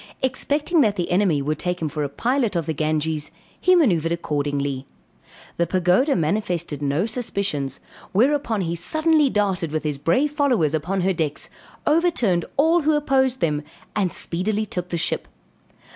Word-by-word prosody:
Expecting 290 +5 +1
that 210 -6 +2
the 175 -2 -2
enemy 175 -6 +2
would 150 +2 -2
take 180 0 -2
him 160 - -1
for 150 0 -3
a 140 - -2
pilot 240 - 0
of 170 -2 0
the 160 - -1
Ganges, 155 0 -1 0.3
he 365 0 +4
manoeuvred 175 - +3
accordingly. 145 -4 -2 0.7
The 170 - +1
Pagoda 185 - +2
manifested 170 -3 -1
no 145 +6 +1
suspicions, 200 - -2 0.3
whereupon 235 -1 +2
he 170 -1 -2
suddenly 315 - +2
darted 195 -7 0
with 155 0 -2
his 150 -2 -2
brave 260 - +2
followers 255 - +2
upon 175 +5 -1
her 190 +1 +2
decks, 155 -4 -2 0.3
overturned 295 - +2
all 325 +4 +4
who 310 0 +2
opposed 265 -3 +1
them, 150 -2 +1 0.3
and 195 -4 +1
speedily 210 +5 -1
took 180 -3 -5
the 170 - -2
ship. 165 - -2
180 Hz, 160 wpm, -23 LUFS, 155-255 Hz, 0.7 s, he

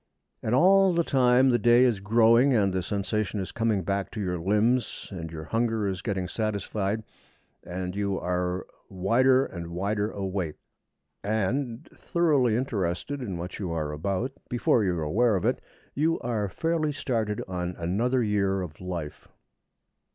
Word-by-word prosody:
And 110 - 0
all 190 +5 +5
the 170 - +3
time 130 -2 +4
the 120 - +2
day 120 +2 +5
is 115 -6 +2
growing, 115 +5 +4
and 100 -4 +2
the 95 - 0
sensation 105 +2 -2
is 95 - -4
coming 110 -4 0
back 100 +1 -1
to 110 - -5
your 90 -3 -2
limbs, 105 +7 +1
and 85 -4 -6
your 80 -1 -6
hunger 115 +3 0
is 95 -1 -3
getting 95 -5 -2
satisfied, 105 0 -2 0.6
and 90 +1 -5
you 100 -1 -1
are 90 0 -2 0.2
wider 130 +8 +3
and 85 -2 -7
wider 100 +5 -1
awake. 95 -6 -3 0.7
And, 115 +6 -1
thoroughly 150 - +2
interested 115 +2 -2
in 100 -8 -4
what 90 +2 -6
you 95 -4 -3
are 75 -2 -2
about, 95 - -2 0.2
before 120 -2 +2
you 90 -3 +1
are 80 - -2
aware 110 +9 +2
of 95 - -1
it, - - +1 0.3
you 160 +4 +1
are 110 -4 -1
fairly 160 - 0
started 115 -7 -2
on 90 -1 -3
another 115 +9 0
year 100 -3 +1
of 80 -2 -9
life. 85 -5 -6
105 Hz, 160 wpm, -27 LUFS, 90-120 Hz, 0.7 s, all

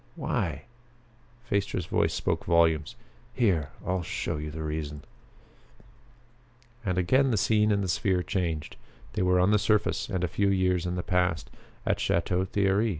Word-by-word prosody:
Why?" - - -2 0.8
Phaestra's 100 -5 -1
voice - - +1
spoke - - -1
volumes. 80 -6 +2 0.4
"Here 90 - +2 0.2
I'll 95 0 0
show 80 - -3
you 75 +1 -5
the 80 +1 -6
reason." 75 -1 -4 1.8
And 95 -4 -1
again 130 +10 +3
the 115 - +1
scene 105 +1 +3
in 100 -1 +2
the 95 - -1
sphere 90 0 +1
changed. 85 -7 -2 0.4
They - - -1
were 90 0 +3
on 90 +3 +4
the 105 - +4
surface 105 +1 +1
and 95 -3 -2
a - - +2
few 100 +3 +1
years 90 -2 +1
in 90 - -2
the 90 - -3
past 90 -3 0 0.3
at - - +1
Chateau 90 +2 +1
Thierry. 100 +3 +1
90 Hz, 155 wpm, -28 LUFS, 85-100 Hz, 1.8 s, on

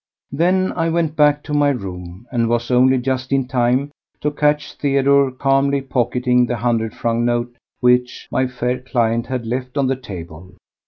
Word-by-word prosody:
Then 180 +6 +1
I 165 -1 -1
went 165 -2 0
back 150 -1 +3
to 150 - -6
my 145 -1 +3
room, 95 -5 -6
and 115 -3 0
was 120 +1 -1
only 130 +1 +4
just 130 +1 -2
in 135 -2 +1
time 130 +3 +1 0.3
to 150 - 0
catch 150 0 0
Theodore 140 -1 +2
calmly 135 +2 +1
pocketing 125 -1 +1
the 120 - -2
hundred 115 -1 -1
franc 115 -1 -1
note 120 0 -1 0.3
which 125 0 +1
my 130 0 +1
fair 125 0 -2
client 120 -3 0
had 130 -3 -3
left 125 +3 -4
on 140 - +2
the 135 +1 +1
table. 90 -6 -10
125 Hz, 170 wpm, -19 LUFS, 120-140 Hz, 0.3 s, only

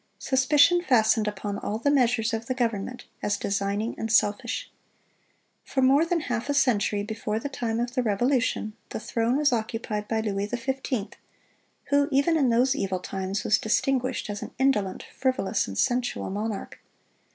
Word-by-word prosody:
Suspicion 290 +6 +4
fastened 220 -7 +3
upon 205 0 -3
all 210 - -3
the 285 +6 +1
measures 235 -4 +2
of 225 0 -3
the 255 - -1
government, 235 -1 -2 0.2
as 205 0 0
designing 200 +2 -1
and 225 - -2
selfish. 225 +2 +1 0.9
For 265 - -1
more 275 +5 +5
than 335 -1 0
half 245 -2 -3
a 285 - +1
century 210 -6 +2
before 215 0 -3
the 285 - -4
time 235 -4 -2
of 240 +1 -2
the 255 - +1
Revolution, 240 0 0 0.2
the - - -4
throne 230 +3 0
was 290 -3 +3
occupied 220 -2 -3
by 225 -1 0
Louis 200 -2 -2
XV., 245 -1 -3 0.8
who, 285 0 +4
even 280 +5 +3
in 275 -5 +3
those 250 +3 +3
evil 190 -7 -1
times, 190 +2 -3
was 215 - +3
distinguished 255 +3 0
as 205 - -5
an - - -8
indolent, 250 -8 +1
frivolous, 255 -7 0
and 100 -1 -6
sensual 245 - 0
monarch. 210 +1 -4
230 Hz, 165 wpm, -26 LUFS, 210-265 Hz, 0.9 s, more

